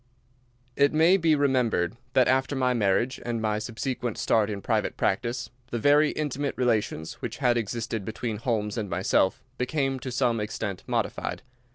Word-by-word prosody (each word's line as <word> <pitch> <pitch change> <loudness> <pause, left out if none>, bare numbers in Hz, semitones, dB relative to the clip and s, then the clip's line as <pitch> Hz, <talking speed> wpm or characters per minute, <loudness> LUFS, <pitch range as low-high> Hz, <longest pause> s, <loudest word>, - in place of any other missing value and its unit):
It 140 +1 +3
may 165 +4 +5
be 165 -4 +3
remembered 125 - +1 0.2
that 130 -3 +4
after 130 +2 +2
my 130 -1 +2
marriage, 120 +3 +1
and 120 -1 -2
my 105 -1 0
subsequent 120 +1 -3
start 110 -2 +2
in 105 -2 -3
private - - -1
practice, 120 0 -1 0.2
the 120 - -2
very 145 +5 +4
intimate 145 -1 -2
relations 110 -10 -1
which - - -4
had 120 -1 +2
existed 115 -1 -2
between 110 +2 -4
Holmes 110 -1 -1
and 105 -3 -4
myself 95 +1 +1 0.2
became 135 +1 0
to 130 +1 -5
some 120 -2 +1
extent 105 -2 -4
modified. - - -2
120 Hz, 160 wpm, -27 LUFS, 110-135 Hz, 0.2 s, may